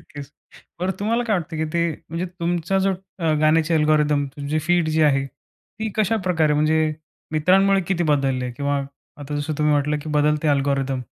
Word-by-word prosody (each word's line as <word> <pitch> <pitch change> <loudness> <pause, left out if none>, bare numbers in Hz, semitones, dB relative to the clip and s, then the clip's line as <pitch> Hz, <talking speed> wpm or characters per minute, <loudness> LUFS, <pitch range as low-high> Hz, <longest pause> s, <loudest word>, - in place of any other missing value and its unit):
नक्कीच. 145 -1 -11 0.5
बरं, 185 +1 0
तुम्हाला 230 +4 +1
काय 215 -4 +1
वाटतं 165 -1 -5
की 155 - -1
ते, 170 0 +1 0.2
म्हणजे 165 +3 -3
तुमचा 175 +2 0
जो 195 +1 +2 0.3
अ, 165 -3 +1
गाण्याची 155 +1 +3
अल्गोरिदम 150 -2 +2
तुमची 145 +2 -2
फीड 170 +1 +1
जी 155 0 +2
आहे 135 -2 +3
ती 220 +10 -10
कशाप्रकारे 185 -8 +1
म्हणजे 155 +1 +2 0.4
मित्रांमुळे 195 +5 +3
किती 180 -2 +1
बदललेली 135 -4 +1
आहे? 125 - -4
किंवा 140 +2 -1 0.4
आता 145 +1 -6
जसं 145 +2 -2
तुम्ही 150 0 +2
म्हटलं 150 +1 0
की 155 - -7
बदलते 150 +1 +1
अल्गोरिदम 135 -2 0
155 Hz, 170 wpm, -22 LUFS, 145-175 Hz, 0.5 s, गाण्याची